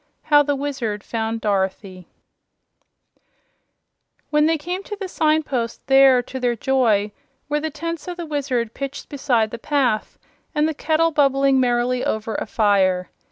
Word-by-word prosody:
How 295 -1 +5
the 290 0 0
Wizard 270 -7 -3
Found 225 0 -3
Dorothy 190 -2 -2 2.2
When 300 0 +4
they 325 0 +2
came 355 +5 -4
to 415 - -7
the 390 - -4
signpost, 305 -8 -1
there, 270 -2 +6
to 260 +2 -7
their 245 -1 0
joy, 225 -5 +1 0.4
were 295 +1 0
the 315 +1 -3
tents 335 +3 -5
of 355 -1 -5
the 345 - -5
Wizard 265 -7 -2
pitched 275 0 -6
beside 245 -6 0
the 235 - -6
path 255 -6 0 0.4
and 300 +1 +2
the 315 - -1
kettle 320 +2 +1
bubbling 275 -2 +3
merrily 245 0 +1
over 220 0 -2
the - - -5
fire. 190 -4 +1
270 Hz, 150 wpm, -21 LUFS, 225-300 Hz, 2.2 s, there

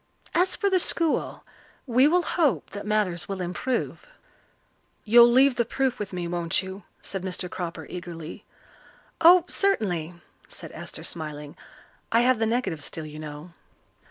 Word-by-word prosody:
As 365 +2 +2
for 405 - 0
the 380 -2 +3
school, 335 -2 0 0.4
we 255 +1 +4
will 350 +3 +3
hope 280 - 0
that 205 0 -7
matters 190 -6 0
will 195 -1 -3
improve." 180 +8 -3 1.0
"You'll 235 +2 +8
leave 260 +1 +5
the 235 - +3
proof 260 +2 -1
with 205 -2 -4
me, 180 -2 -4
won't 170 +1 0
you?" 190 +1 -8 0.2
said 195 - -4
Mr. 185 0 -3
Cropper 175 -1 -6
eagerly. 170 -2 -8 0.8
"Oh, 350 +1 +8
certainly," 180 - 0 0.3
said - - -10
Esther, - - -8
smiling. 150 -3 -6 0.6
"I 230 - +4
have 250 -1 +3
the 225 - +1
negative 225 -10 -1
still, 160 +2 -6
you 155 0 -9
know." 155 +2 -9
195 Hz, 150 wpm, -26 LUFS, 170-255 Hz, 1.0 s, You'll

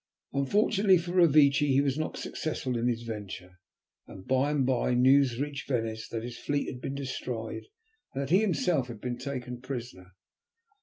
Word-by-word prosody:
Unfortunately 195 - +3
for 175 +1 -4
Revecce 155 -6 +5
he 135 0 +4
was 140 -2 +1
not 155 +1 -3
successful 135 -5 -3
in 120 +1 0
his 120 -1 -1
venture, 95 -5 -7 0.5
and 95 -1 -11
by 130 +2 +2
and 145 -3 +1
by 125 -1 +1
news 130 -1 +4
reached 145 0 -4
Venice 115 -4 -2
that 115 -1 -4
his 120 0 -7
fleet 145 0 -1
had 125 - -9
been 135 - -4
destroyed, 125 -4 -5 0.5
and 140 - -1
that 135 - -5
he 185 - +6
himself 175 - +1
had 115 -4 -8
been 120 +1 -4
taken 125 -3 -5
prisoner. 120 -8 -7
130 Hz, 170 wpm, -29 LUFS, 120-145 Hz, 0.5 s, he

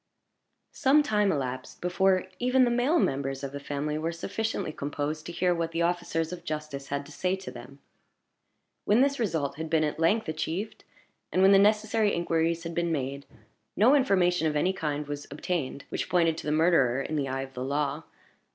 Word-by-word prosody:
Some 285 +3 +4
time 210 -6 +2
elapsed 130 -4 -4
before 185 +1 +2 0.2
even 255 +1 +3
the 240 - +1
male 250 +8 +2
members 135 - -1
of 135 - -4
the 140 - -6
family 145 +2 -3
were 165 +2 -1
sufficiently 195 +2 -3
composed 145 +2 -4
to - - -5
hear 180 +1 +1
what 165 -1 -2
the 170 +1 +1
officers 170 -1 -1
of 175 -1 -8
justice 150 -3 -5
had 140 0 -3
to 145 - -13
say 180 +5 -1
to 190 0 -8
them. 135 +1 -11 1.1
When 215 +4 +4
this 280 0 +2
result 155 - -1
had 160 0 -5
been 160 -1 +2
at 150 +1 -2
length 205 +7 +2
achieved, 160 +6 -4 0.5
and 185 - +3
when 195 - +7
the 195 - +7
necessary 215 +1 +3
inquiries 165 0 0
had 170 0 -5
been 170 0 0
made, 140 -2 -3 0.5
no 230 +7 +5
information 180 - +3
of 150 - -1
any 180 +6 +2
kind 150 -4 -3
was 145 0 -6
obtained 145 -2 -3
which - - -3
pointed 165 -3 +3
to - - -7
the - - +1
murderer, 155 -6 +3
in 155 - -4
the 140 -2 0
eye 135 0 -2
of 135 0 -10
the 125 - -5
law. 145 +2 -1
165 Hz, 195 wpm, -28 LUFS, 145-190 Hz, 1.1 s, when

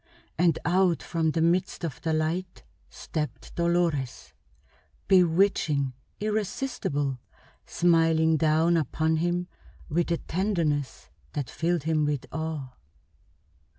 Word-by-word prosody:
And 165 -1 +3
out 180 0 +2
from 165 -2 0
the 160 +1 +1
midst 175 +2 +1
of 135 -6 -6
the 165 - -1
light 165 +4 -2 0.3
stepped 150 -2 -5
Dolores, 170 -7 0 0.7
bewitching, 165 -7 +3 0.3
irresistible, 205 - -2 0.5
smiling 165 -2 +3
down 160 +2 +3
upon 160 +2 0
him 175 +2 0 0.4
with 170 +3 0
a 170 - +2
tenderness 165 -8 -2 0.2
that 145 -4 -3
filled 170 -1 0
him 155 -1 +1
with 145 -3 -1
awe. 160 -4 -4
165 Hz, 105 wpm, -27 LUFS, 155-175 Hz, 0.7 s, And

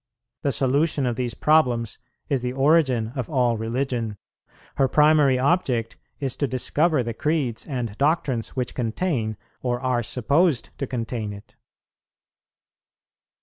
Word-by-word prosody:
The 140 - +1
solution 140 +2 +1
of 120 -2 0
these 120 -3 -3
problems 125 -8 +2 0.3
is 135 -3 0
the 125 0 -3
origin 135 -5 +3
of 125 -4 -3
all 125 -5 +2
religion; 115 -1 -2 0.6
her 135 - +4
primary 150 -2 +4
object 130 -5 +1 0.2
is 135 -3 -2
to 140 - 0
discover 145 +3 +1
the 115 0 -4
creeds 135 -3 -1
and 125 -7 -3
doctrines 140 -5 0
which 125 -2 -2
contain, 115 - -2 0.2
or 120 -1 -1
are 125 -2 0
supposed 130 +6 +1
to 140 - -2
contain 115 -4 -4
it. 100 0 -13
130 Hz, 130 wpm, -24 LUFS, 115-145 Hz, 0.6 s, her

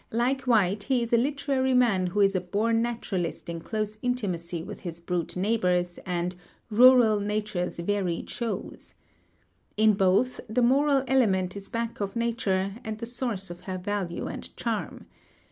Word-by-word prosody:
Like 255 +3 0
White, 205 -4 +3
he 255 -3 +2
is 235 - -4
a - - +7
literary 270 0 +1
man 215 -7 +3
who 205 +4 0
is 195 0 +4
a 185 - +1
born 220 +5 +1
naturalist 200 -9 -3
in 170 0 -4
close 215 +4 -3
intimacy 180 -9 -2
with 205 +3 -8
his 170 -2 -6
brute 170 0 -3
neighbors 180 -3 0
and 180 0 -1 0.4
"rural 235 -2 +7
nature's 210 -3 -2
varied 180 -1 -1
shows." 235 -2 -5 0.8
In 215 0 +5
both, 195 +6 +2
the 240 +3 +1
moral 275 +2 +4
element 195 -8 +2
is 200 -1 -8
back 230 0 -3
of 200 +2 -3
nature 210 -4 0
and 220 -2 -4
the 230 - -5
source 230 -6 -3
of 175 0 -9
her 185 - -2
value 185 -2 -3
and - - -7
charm. - - -3
210 Hz, 160 wpm, -27 LUFS, 185-235 Hz, 0.8 s, a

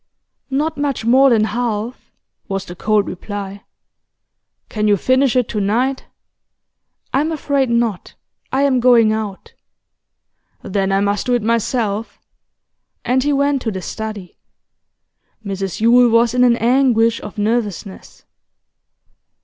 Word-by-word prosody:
'Not 295 +3 -1
much 280 -6 -2
more 265 +3 +5
than 225 -3 +3
half,' 230 +1 -3 0.4
was 195 0 -3
the 175 - -9
cold 210 +2 +1
reply. 200 +1 -7 1.0
'Can 215 -1 -2
you 205 -1 +4
finish 260 +5 +2
it 250 -2 +2
to 210 - -2
night?' 245 +7 0 1.1
'I'm 295 +4 +1
afraid 280 -4 0
not. 235 -4 -1 0.4
I 270 +2 +1
am 270 -3 +2
going 235 -3 +5
out.' 215 -3 -5 1.1
'Then 195 0 -1
I 195 0 +2
must 200 +2 -1
do 245 - +2
it 240 - -1
myself' 225 -1 -1 0.9
And 250 +2 +2
he 290 +2 0
went 280 -1 +1
to 230 - -2
the 190 -3 -5
study. 215 -4 -7 1.1
Mrs 195 -1 -4
Yule 240 +2 +5
was 230 +1 +3
in 250 0 +3
an 240 -1 +5
anguish 235 -2 +2
of 210 +1 -9
nervousness. 210 -3 -3
230 Hz, 130 wpm, -18 LUFS, 205-255 Hz, 1.1 s, more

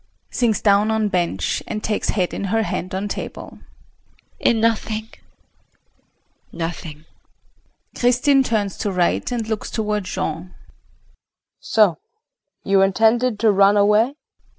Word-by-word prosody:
[Sinks 225 -5 0
down 205 +1 +4
on 220 -1 +1
bench, 170 - -1
and 215 -1 -4
takes 215 - -1
head 185 -4 0
in - - -3
her 225 +3 +1
hand 185 -3 -4
on 195 +2 -2
table.] - - -7 0.8
In 230 - +2
nothing 220 -1 -1 1.4
nothing! 165 -2 -6 0.9
KRISTIN 250 +3 +3
[Turns 215 -6 -1
to 205 - -1
R. 185 -2 -4
and 225 +6 0
looks 220 -1 -3
toward 210 -3 -2
Jean]. 165 +1 -4 1.0
So 205 -8 +2 0.6
you 195 0 +3
intended 225 +4 +2
to 225 -2 +5
run 200 +1 +4
away? 210 +6 +3
210 Hz, 120 wpm, -21 LUFS, 190-225 Hz, 1.4 s, to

